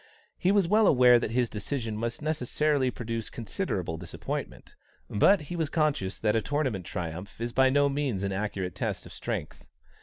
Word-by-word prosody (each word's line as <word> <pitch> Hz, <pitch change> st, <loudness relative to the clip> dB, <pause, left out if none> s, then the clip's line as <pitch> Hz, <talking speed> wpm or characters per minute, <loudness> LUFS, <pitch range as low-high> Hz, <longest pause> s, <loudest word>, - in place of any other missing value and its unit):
He 185 Hz, -, +3 dB
was 200 Hz, -4 st, +3 dB
well 210 Hz, +2 st, +4 dB
aware 125 Hz, -2 st, +7 dB
that -, -, -2 dB
his 120 Hz, +1 st, +1 dB
decision 110 Hz, +1 st, -3 dB
must 115 Hz, +5 st, -3 dB
necessarily 150 Hz, -2 st, +1 dB
produce 115 Hz, -2 st, -4 dB
considerable 105 Hz, -, -3 dB
disappointment, 85 Hz, -, -6 dB, 0.4 s
but 185 Hz, -, +5 dB
he 150 Hz, +4 st, -6 dB
was 160 Hz, -3 st, -1 dB
conscious 150 Hz, -, 0 dB
that 105 Hz, 0 st, +1 dB
a 110 Hz, -, +3 dB
tournament 130 Hz, -, -1 dB
triumph 90 Hz, +4 st, -5 dB
is 120 Hz, 0 st, -3 dB
by 130 Hz, 0 st, +5 dB
no 145 Hz, +1 st, +4 dB
means 135 Hz, -8 st, -1 dB
an 100 Hz, -, -1 dB
accurate 95 Hz, -2 st, -2 dB
test -, -, -3 dB
of -, -, -11 dB
strength. -, -, -5 dB
120 Hz, 175 wpm, -28 LUFS, 105-150 Hz, 0.4 s, aware